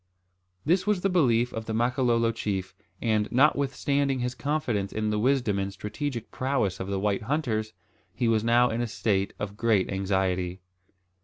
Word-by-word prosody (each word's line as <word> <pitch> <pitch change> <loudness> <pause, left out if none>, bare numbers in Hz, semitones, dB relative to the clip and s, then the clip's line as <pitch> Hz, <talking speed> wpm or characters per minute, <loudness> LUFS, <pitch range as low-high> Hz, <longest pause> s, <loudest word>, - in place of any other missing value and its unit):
This 180 +5 +2
was 210 -4 +2
the 195 - +1
belief 125 -8 +2
of 115 0 -4
the 110 - -2
Makololo 120 -1 +2
chief; 95 -4 -3 0.3
and, 110 -2 +1
notwithstanding 140 0 +2
his 125 0 -2
confidence 130 -10 -1
in 110 0 -1
the 105 - 0
wisdom 125 -4 +1
and 100 0 -2
strategic 115 +5 -5
prowess 130 -8 -1
of 95 - -4
the 100 -1 -1
white 100 0 0
hunters, 110 -4 -1 0.4
he 120 - -1
was 110 -1 +2
now 120 +1 +4
in 115 +2 -1
a 120 - -1
state 100 -3 0
of 100 -1 -5
great 110 -5 +2
anxiety. 95 -2 -1
115 Hz, 165 wpm, -27 LUFS, 100-130 Hz, 0.4 s, now